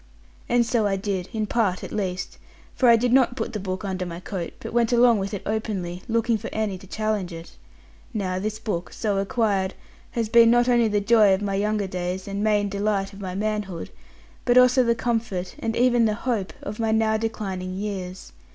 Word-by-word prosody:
And 240 0 +3
so 230 -3 +1
I 195 - +1
did: 195 -2 -3
in 220 -3 -1
part 210 -5 0
at - - -7
least. 185 -3 -3 0.3
For 250 - +3
I 235 - +8
did 240 +1 +1
not 255 -2 +4
put 230 -2 -4
the 210 - -2
book 185 +1 -4
under 185 -1 -2
my 170 -1 -6
coat, 180 -2 -5
but - - -7
went 235 -1 +2
along 240 -2 +5
with 195 +1 -3
it 205 - -5
openly, 195 -5 -3
looking 230 -1 +1
for 225 - -6
any 210 -4 -2
to 190 - -14
challenge 215 -3 -2
it. 165 0 -9 0.6
Now 190 -5 -2
this 215 +2 -3
book, 210 -6 -4
so 205 -3 -1
acquired, 195 -2 0 0.4
has 230 -2 0
been 230 +1 +6
not 240 +1 +4
only 240 -2 +4
the 205 -1 +1
joy 210 -2 +5
of 195 - -5
my 200 -1 -1
younger 210 +1 0
days, 185 0 -4
and 200 +1 -3
main 210 -1 +2
delight 200 0 -1
of 195 - -10
my 185 -2 -5
manhood, 205 -4 -3 0.5
but 245 0 +3
also 250 +1 +6
the 235 -1 +2
comfort, 225 -7 -2
and 225 0 -2
even 240 -1 +4
the 215 -1 +1
hope, 215 -7 -2
of 210 +2 -6
my 225 -1 +1
now 220 0 +2
declining 195 -5 -4
years. 190 - -5
210 Hz, 205 wpm, -24 LUFS, 190-230 Hz, 0.6 s, I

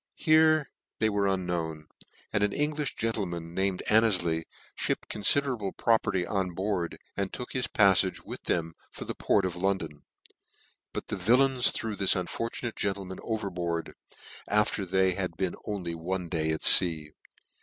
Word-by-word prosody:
Here 155 -2 +4 0.3
they 110 -1 +2
were 100 -1 +1
unknown; 85 -5 -2 0.5
and 105 - +1
an 105 0 +1
En 150 +1 +1
glim 150 -1 -3
gentleman, 90 -7 -3
named 95 0 -1
Anneiley, 90 -7 +2 0.3
fhipped - - -2
confi 105 +7 +4
derable 115 -8 -4
property 105 -5 +2
on 95 -3 -2
board, 95 -3 -2 0.2
and 100 -1 -2
took 125 - -7
his 130 -2 0
pafiage 95 -3 +3
with - - -7
them 80 -1 0 0.2
for - - -8
the - - -4
port 100 -2 +1
of 90 -2 -3
London: 90 -5 -2 0.9
but - - -6
the - - -2
vil 120 +3 +4
lains 130 -2 +2
threw 110 -2 -2
this 100 -1 +3
unfortunate 115 +5 -3
gentleman 95 -2 -3
overboard, 90 -7 -3 0.5
after 105 -1 +1
they 95 +1 +3
had 90 -3 -3
been 95 -2 -1
only 95 -5 -3
one 90 +2 -4
day 80 -2 -1
at 80 0 -2
fea. 80 -4 +6
95 Hz, 155 wpm, -28 LUFS, 85-110 Hz, 0.9 s, fea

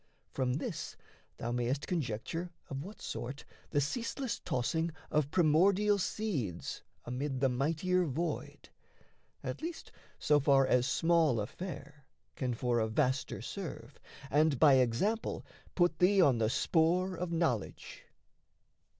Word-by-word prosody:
From 130 -2 0
this 150 - -4 0.4
thou 120 - -3
mayest 125 +4 -1
conjecture 165 +2 -3 0.2
of 135 +1 -3
what 205 +5 -10
sort 130 +4 -5 0.2
The 145 - +1
ceaseless 230 - -2
tossing 160 +7 -1 0.2
of 150 -2 +2
primordial 190 +6 +4
seeds 150 - -3 0.2
Amid 130 +2 -3
the 135 0 +3
mightier 165 +8 +1
void 165 +4 -4 0.7
at - - -4
least 330 +1 -6 0.3
so 150 -1 +3
far 135 -1 +4
As 125 -1 +3
small 165 -8 +3
affair 150 - -7 0.3
can 125 -2 -2
for 120 0 +1
a 110 - +1
vaster 125 +2 0
serve, 170 -3 -7 0.3
And 150 -1 +3
by 140 -1 +7
example 130 - 0 0.3
put 175 -1 +2
thee 195 +2 +5
on 135 -10 +5
the 110 -1 +2
spoor 175 +7 +2
Of 175 0 -4
knowledge. 160 - -2
150 Hz, 125 wpm, -32 LUFS, 125-180 Hz, 0.7 s, by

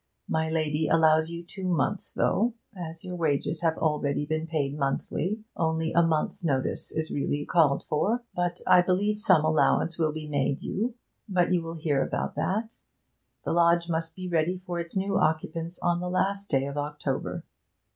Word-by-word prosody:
My 160 0 0
lady 155 -1 0
allows 160 0 +4
you 170 0 -6
two 185 +2 -6
months, 180 +3 0
though, 230 +3 +2 0.2
as 165 -2 -7
your 180 -1 -5
wages 160 -1 0
have 165 -2 +1
always 150 -2 0
been 155 +1 -2
paid 145 -4 -1
monthly, 155 +8 -2
only 160 -3 0
a 170 - +5
month's 165 +1 0
notice 135 -5 -1
is 160 0 -3
really 145 +1 -1
called 155 -5 +3
for. 220 +11 +1 0.4
I 180 -1 +7
believe 200 +4 +1
some 155 -6 +4
allowance 160 +2 +2
will 155 -2 +2
be 155 0 -6
made 140 -2 -1
you, 230 +4 -2 0.3
but 185 -1 +2
you 175 - +2
will 165 0 -6
hear 150 -4 0
about - - -2
that. 220 +4 -2 0.7
The - - 0
lodge 170 0 +3
must 165 0 -2
be 185 -1 -6
ready 175 +1 +1
for 175 -1 -3
its 170 +2 -4
new 195 +1 +1
occupants 160 +2 -1
on 175 0 +2
the 180 0 -3
last 195 +2 0
day 135 -1 +2
of 140 +1 -4
October.' 145 -2 -3
165 Hz, 175 wpm, -27 LUFS, 155-180 Hz, 0.7 s, I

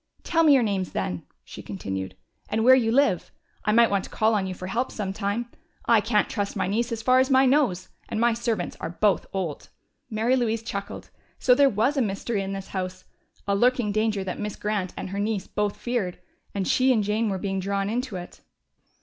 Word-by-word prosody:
"Tell 330 -1 +2
me 305 -3 +6
your 255 - +4
names, 195 -4 -1
then," 90 -1 -3 0.2
she - - -10
continued, 95 -1 -5 0.3
"and 220 +1 0
where 255 +2 +8
you 235 -4 +3
live. 255 -8 +2 0.3
I 210 - +1
might 230 0 +5
want 200 -1 +1
to - - -11
call 220 +1 +2
on 200 -3 0
you 185 - -4
for 185 - -7
help 235 +7 -1
sometime. 205 +3 -3 0.3
I 230 -2 +5
can't 210 0 +2
trust 205 -2 -3
my - - 0
niece 230 +5 -1
as 225 -1 -3
far 255 +2 +5
as 260 +1 +2
my 265 0 +5
nose, 255 -10 +2 0.2
and - - -2
my 235 0 +3
servants 230 -5 -2
are 160 - -4
both 200 +4 +1
old." 180 -6 -4 0.4
Mary 225 +3 +1
Louise 230 -3 0
chuckled. 200 -3 -6 0.3
So 250 - +4
there 275 +2 +5
was 235 +7 +1
a - - +3
mystery 205 0 -1
in 195 0 -4
this 195 -1 -6
house! 185 -1 -4 0.4
A 200 - +2
lurking 245 0 +2
danger 215 -1 0
that 185 -1 -5
Miss 210 -1 -4
Grant 210 -3 -2
and - - -5
her 200 - -3
niece 205 -2 -1
both 210 -1 -2
feared! 235 -8 -2 0.4
And 195 -2 -1
she 260 +1 +3
and 220 -4 +2
Jane 215 +2 0
were 195 - -1
being 195 0 -2
drawn 195 +1 -1
into 240 0 -2
it. 175 -1 -8
210 Hz, 215 wpm, -25 LUFS, 195-235 Hz, 0.4 s, where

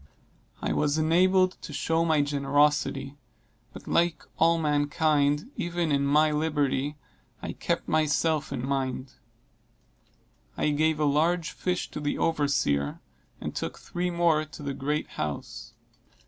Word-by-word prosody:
I - - 0
was 150 0 +1
enabled 185 +4 +3
to - - -8
show 165 0 0
my 155 -3 +3
generosity, 145 -1 +1 0.5
but, - - -12
like 170 -3 +1 0.2
all 165 +1 +4
mankind, 150 - +1
even 175 -5 -1
in 140 0 +2
my 150 +2 +4
liberality, 150 -2 0 0.5
I - - -3
kept - - -2
myself 155 0 +1
in 130 -2 -3
mind. 130 -1 -2 1.4
I - - +1
gave 155 +1 +1
a 150 - +2
large 160 +4 +1
fish 180 -1 -2
to - - -5
the 145 -1 -2
overseer, 140 - 0 0.4
and - - -5
took - - -4
three 180 +1 -3
more 170 -3 +2
to 155 -1 -11
the 140 -1 -3
great 150 +3 -2
house. 115 -4 -6
150 Hz, 135 wpm, -27 LUFS, 140-165 Hz, 1.4 s, all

